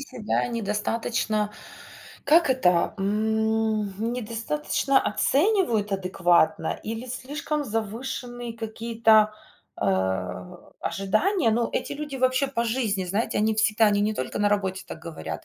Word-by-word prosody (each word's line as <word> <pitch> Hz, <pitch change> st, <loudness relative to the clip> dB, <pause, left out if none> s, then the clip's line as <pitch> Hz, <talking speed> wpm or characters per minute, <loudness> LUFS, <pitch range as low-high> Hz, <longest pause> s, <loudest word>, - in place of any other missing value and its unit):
себя 255 Hz, -7 st, -2 dB
недостаточно, 215 Hz, -1 st, -1 dB, 0.7 s
как 325 Hz, +2 st, +5 dB
это, 180 Hz, -8 st, +2 dB
м, 220 Hz, +1 st, +1 dB, 0.2 s
м, 230 Hz, +2 st, -1 dB
недостаточно 250 Hz, +4 st, 0 dB
оценивают 270 Hz, -, +1 dB
адекватно 175 Hz, -4 st, +1 dB
или 225 Hz, +3 st, -5 dB
слишком 290 Hz, +4 st, -3 dB
завышенные 235 Hz, +1 st, -4 dB
какие-то, 225 Hz, -1 st, +2 dB, 0.5 s
э, -, -, 0 dB, 1.0 s
ожидания. 225 Hz, -, +1 dB
Но 230 Hz, +1 st, +1 dB
эти -, -, -2 dB
люди 290 Hz, -1 st, -5 dB
вообще 255 Hz, +1 st, +2 dB
по 250 Hz, -4 st, -1 dB
жизни, 220 Hz, -5 st, 0 dB
знаете, 200 Hz, +6 st, -1 dB
они 215 Hz, +1 st, +2 dB
всегда, 215 Hz, 0 st, +3 dB
они 205 Hz, -1 st, +3 dB
не 215 Hz, +1 st, +1 dB
только 130 Hz, -, -4 dB
на 205 Hz, 0 st, +3 dB
работе 190 Hz, -2 st, -1 dB
так -, -, -8 dB
говорят, 160 Hz, -1 st, -7 dB
225 Hz, 120 wpm, -25 LUFS, 210-255 Hz, 1.0 s, как